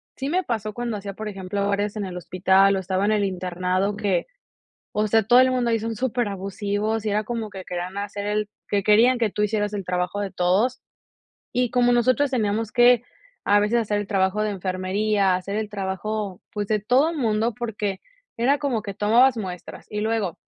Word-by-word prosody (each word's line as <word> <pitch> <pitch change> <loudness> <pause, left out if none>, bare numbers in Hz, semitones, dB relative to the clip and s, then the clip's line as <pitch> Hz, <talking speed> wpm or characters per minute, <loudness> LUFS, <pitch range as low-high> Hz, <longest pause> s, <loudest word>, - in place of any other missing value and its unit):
sí 270 +1 -3
me 365 +4 +1
pasó 215 -3 -2
cuando 240 -1 -3
hacía, 200 -1 -5
por 215 +2 -6
ejemplo, 200 0 -3
horas 205 +1 -1
en 205 - -2
el 185 -1 -7
hospital, 190 +2 +3
o - - 0
estaba 190 +1 -1
en 210 - +2
el 210 -1 +2
internado 185 +2 -1
que, 195 -4 0 0.6
o 210 - 0
sea, 225 +2 +4
todo 240 +4 +5
el 260 0 +5
mundo 250 -2 +1
ahí 230 - +2
son 225 +1 -3
superabusivos. 210 -2 -2
Y 210 - 0
era 210 +1 +1
como 225 -1 -4
que 190 -1 -8
querían 180 +1 -5
hacer 205 0 -5
el 210 0 -1 0.2
que 205 - +1
querían 225 +5 +4
que 225 -2 +2
tú 210 - -1
hicieras 210 0 0
el 195 -3 -4
trabajo 180 +2 -1
de 200 -2 -3
todos. 210 +9 +1 0.7
Y 250 -1 +1
como 245 0 +3
nosotros 255 +4 +3
teníamos 220 -2 0
que, 245 0 +5 0.4
a 205 0 +4
veces 210 +3 +2
hacer 205 -1 -1
el 205 - -4
trabajo 195 +1 +1
de 215 - 0
enfermería, 190 +1 0
hacer 195 +2 -5
el 220 -1 -3
trabajo, 200 0 -4
pues, 210 -1 -3
de 215 +1 0
todo 265 +10 +2
mundo, 225 -4 0
porque 210 -4 -3 0.4
era 255 +5 +3
como 275 -6 -1
que 200 -2 -6
tomabas 235 +5 +4
muestras, 185 -5 -7
y 210 - -3
luego, 215 -5 -1
210 Hz, 200 wpm, -24 LUFS, 195-230 Hz, 0.7 s, todo